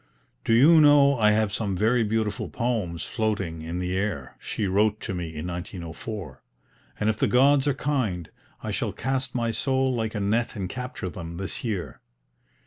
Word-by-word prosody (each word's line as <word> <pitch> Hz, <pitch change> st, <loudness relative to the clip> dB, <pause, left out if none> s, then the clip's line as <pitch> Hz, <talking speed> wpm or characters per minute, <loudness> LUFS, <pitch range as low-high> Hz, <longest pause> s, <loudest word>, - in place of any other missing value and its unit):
"Do 115 Hz, -, +2 dB
you 155 Hz, +7 st, +7 dB
know 140 Hz, -3 st, +6 dB
I 105 Hz, -1 st, +5 dB
have 105 Hz, -1 st, +2 dB
some 100 Hz, -4 st, -1 dB
very 115 Hz, +4 st, +3 dB
beautiful 110 Hz, -1 st, -1 dB
poems 105 Hz, -9 st, -2 dB
floating 100 Hz, -8 st, -2 dB
in 85 Hz, +2 st, -5 dB
the 90 Hz, 0 st, -2 dB
air," 95 Hz, -9 st, -3 dB
she 105 Hz, -, -3 dB
wrote 105 Hz, +3 st, +2 dB
to -, -, -4 dB
me 90 Hz, -2 st, -3 dB
in 80 Hz, 0 st, -6 dB
1904; 90 Hz, -, -6 dB, 0.6 s
"and 105 Hz, -, 0 dB
if 110 Hz, 0 st, +1 dB
the -, -, +2 dB
gods 135 Hz, +2 st, +4 dB
are 140 Hz, -, +2 dB
kind 115 Hz, -, -1 dB, 0.4 s
I -, -, -3 dB
shall -, -, -2 dB
cast 130 Hz, 0 st, -2 dB
my 115 Hz, -2 st, 0 dB
soul 130 Hz, +2 st, +1 dB
like 110 Hz, -2 st, -2 dB
a -, -, -1 dB
net 110 Hz, +5 st, 0 dB
and 95 Hz, -3 st, -3 dB
capture 125 Hz, -5 st, -5 dB
them, 85 Hz, -1 st, -7 dB
this 95 Hz, +1 st, -4 dB
year. 105 Hz, -7 st, -4 dB
105 Hz, 180 wpm, -26 LUFS, 90-125 Hz, 0.6 s, you